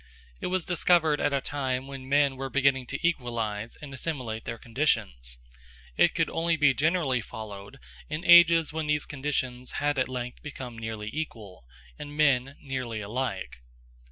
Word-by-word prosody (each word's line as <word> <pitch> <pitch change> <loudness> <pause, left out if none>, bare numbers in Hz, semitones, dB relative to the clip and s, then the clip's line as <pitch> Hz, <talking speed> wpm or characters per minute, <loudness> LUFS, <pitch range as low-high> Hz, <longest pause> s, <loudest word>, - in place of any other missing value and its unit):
It - - -3
was 185 -2 0
discovered 170 -4 +3
at 145 - +2
a 140 -1 +1
time 130 -2 -2
when 135 -1 -8
men 140 -1 +3
were 135 0 -4
beginning 135 -2 +2
to 170 - -1
equalize 115 -7 -2
and 140 -2 -8
assimilate 130 -7 -4
their 115 - -4
conditions. 60 - -1 0.6
It - - +4
could - - +2
only 165 0 0
be 145 -3 +5
generally 150 -4 +1
followed 105 +1 -9 0.3
in 155 +3 -4
ages 170 -2 +7
when 160 -1 -2
those 150 0 +1
conditions 130 -3 -3
had 145 -1 0
at 130 - +1
length 125 -1 -5
become 130 -5 -7
nearly 110 -1 -5
equal, 110 - -6 0.3
and 145 0 -8
men 140 -2 +3
nearly 130 -5 -3
alike. 120 - -4
135 Hz, 155 wpm, -28 LUFS, 120-150 Hz, 0.6 s, ages